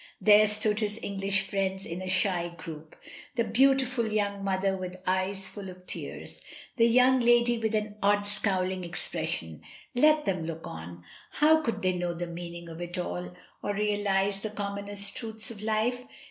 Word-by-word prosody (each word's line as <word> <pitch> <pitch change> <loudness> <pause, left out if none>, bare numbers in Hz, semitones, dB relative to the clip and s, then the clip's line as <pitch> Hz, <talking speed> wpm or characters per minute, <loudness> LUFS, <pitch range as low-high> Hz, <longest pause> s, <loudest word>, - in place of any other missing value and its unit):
There 215 0 +7
stood 210 0 +2
his 210 -1 -2
English 195 0 +1
friends 195 -1 -1
in 170 +2 -5
a 185 - -4
shy 185 -2 +2
group, 160 -2 -9 0.4
the 235 - +2
beautiful 255 0 +3
young 200 -2 -1
mother 195 0 +1
with 185 -1 -5
eyes 190 +1 0
full 200 -2 -7
of 180 0 -12
tears, - - -6 0.3
the 230 -1 +5
young 255 +2 +5
lady 240 0 +4
with 220 -1 0
an 210 0 -2
odd 205 0 +3
scowling 190 -3 0
ex 175 0 -4
pression; 80 -2 -2 0.3
let 305 +4 +4
them 185 -4 -1
look 165 0 -6
on; 85 +2 -8 0.3
how 315 +1 +5
could 230 -9 -3
they 185 0 +2
know 175 -1 -2
the 175 +1 -3
meaning 170 0 -7
of 165 +1 -8
it 175 +1 -5
all, 90 - -4 0.3
or 205 - -2
realise 205 -1 +1
the 215 - -4
commonest 200 -1 -4
truths 220 0 -3
of 210 -3 -9
life? 220 +3 0
200 Hz, 175 wpm, -28 LUFS, 185-220 Hz, 0.4 s, There